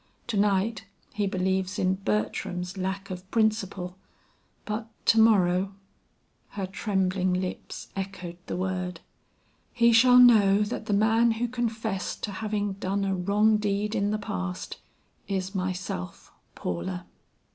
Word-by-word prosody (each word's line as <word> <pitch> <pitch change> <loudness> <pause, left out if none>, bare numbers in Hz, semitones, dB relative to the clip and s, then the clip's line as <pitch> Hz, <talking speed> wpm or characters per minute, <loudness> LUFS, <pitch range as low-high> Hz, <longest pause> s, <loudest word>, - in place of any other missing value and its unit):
To 230 - -1
night 205 +2 +1 0.3
he 205 -1 0
believes 190 +1 -1
in 185 0 +2
Bertram's 180 - -2
lack 195 +1 -3
of 185 +1 -7
principle, 200 -5 0 0.7
but 220 +1 -3 0.2
to 225 - +5
morrow 195 -3 +4 0.4
" - - -42
Her 195 - -1
trembling 190 -1 0
lips 185 0 -5
echoed 190 -3 -5
the - - -3
word. 185 -2 -3 0.7
"He 235 -1 +4
shall 250 +2 +7
know 210 -5 +7
that 215 0 -4
the 210 - +1
man 225 +3 +4
who 235 +2 -1
confessed 225 -5 -3
to 210 - -2
having 205 0 -2
done 195 +1 -2
a 195 - 0
wrong 205 +4 +3
deed 210 0 -1
in 205 -2 +1
the 215 - 0
past, 90 - -4 0.5
is 190 0 -2
myself, 185 - -4 0.2
Paula." 90 +1 -4
195 Hz, 135 wpm, -27 LUFS, 185-215 Hz, 0.7 s, shall